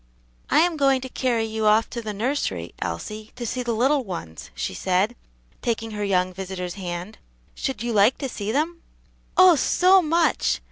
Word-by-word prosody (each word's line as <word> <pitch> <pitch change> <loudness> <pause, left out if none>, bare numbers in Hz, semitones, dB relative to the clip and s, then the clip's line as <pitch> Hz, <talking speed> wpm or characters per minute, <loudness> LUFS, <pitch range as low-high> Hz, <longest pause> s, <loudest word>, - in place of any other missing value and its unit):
"I - - +5
am 340 -1 +1
going 275 -2 +3
to 260 - -6
carry 240 -3 0
you 220 -1 -1
off 215 +2 +4
to 235 - -4
the 215 -2 -4
nursery, 205 - -2
Elsie, 215 - -5
to 245 -1 -5
see 250 +3 -2
the 240 -1 -1
little 270 +4 +2
ones," 165 - -7
she - - -3
said, 185 - 0 0.5
taking 225 -1 -2
her 210 -1 -4
young 185 -2 +1
visitor's 180 -1 -5
hand; 180 +2 -6 0.3
"should 265 -5 -3
you 240 -1 -2
like 210 +4 +4
to 275 - -3
see 210 -4 -4
them?" 325 +6 -1 0.6
"Oh, 370 -2 +8
so 370 +7 +4
much!" 335 +1 +1
225 Hz, 180 wpm, -24 LUFS, 190-270 Hz, 0.6 s, Oh